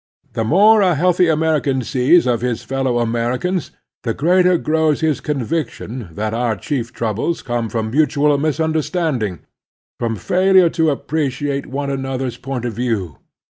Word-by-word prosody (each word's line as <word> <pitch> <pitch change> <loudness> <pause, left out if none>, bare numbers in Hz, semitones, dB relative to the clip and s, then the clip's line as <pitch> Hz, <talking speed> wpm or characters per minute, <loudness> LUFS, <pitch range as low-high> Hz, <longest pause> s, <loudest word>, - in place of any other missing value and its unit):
The 115 -1 -1
more 205 - +5
a 180 -4 +3
healthy 180 +3 +3
American 155 -4 +1
sees 130 +7 +3
of 120 -2 +1
his 125 -2 -2
fellow 135 -2 -1
Americans 120 +10 -1 0.3
the 115 -2 -2
greater 180 +3 +3
grows 155 -2 +1
his 155 -3 0
conviction 130 - -3
that 110 +4 -3
our 115 -1 0
chief 120 +4 -3
troubles 115 +10 -2
come 120 -2 -2
from 110 -1 -3
mutual 150 +1 +2
misunder 155 +1 0
standing, 130 - -2 0.6
from 115 -1 -1
failure 185 - +3
to 160 -2 +1
appreciate 140 -1 -2
one 140 +1 -3
another's 135 -2 -3
point 130 -2 -5
of 120 - -3
view. 110 - -3
135 Hz, 145 wpm, -18 LUFS, 120-160 Hz, 0.6 s, more